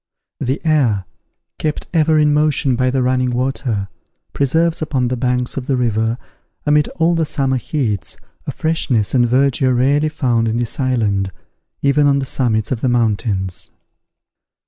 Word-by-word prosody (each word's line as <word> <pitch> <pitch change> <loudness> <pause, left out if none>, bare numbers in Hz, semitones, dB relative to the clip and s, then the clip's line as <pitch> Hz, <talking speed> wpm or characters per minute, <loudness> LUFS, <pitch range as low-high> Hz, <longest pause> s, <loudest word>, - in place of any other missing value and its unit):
The 130 +4 -1
air, 125 - +2 0.5
kept 155 -1 -3
ever 160 -1 +3
in 150 -1 +4
motion 150 -3 +2
by 130 +1 +1
the 130 0 0
running 125 0 +1
water, 125 -4 -2 0.5
preserves 160 +5 +1
upon 135 -6 0
the 130 - -1
banks 125 0 -1
of 130 -1 -4
the 135 - +1
river, 115 -1 0 0.5
amid 150 0 +3
all 165 0 +3
the 165 -1 +1
summer 135 -3 0
heats, 120 - -3 0.3
a - - -1
freshness 135 -9 0
and 120 -2 +3
verdure 130 +1 +2
rarely 140 +5 +2
found 125 -7 0
in 110 +1 -1
this 120 +2 -3
island, 105 -7 0 0.5
even 145 +1 +3
on 140 -1 +3
the 135 - -1
summits 115 -4 -1
of 120 -3 -2
the 130 - +1
mountains. 105 -5 -1
130 Hz, 155 wpm, -18 LUFS, 120-145 Hz, 0.5 s, in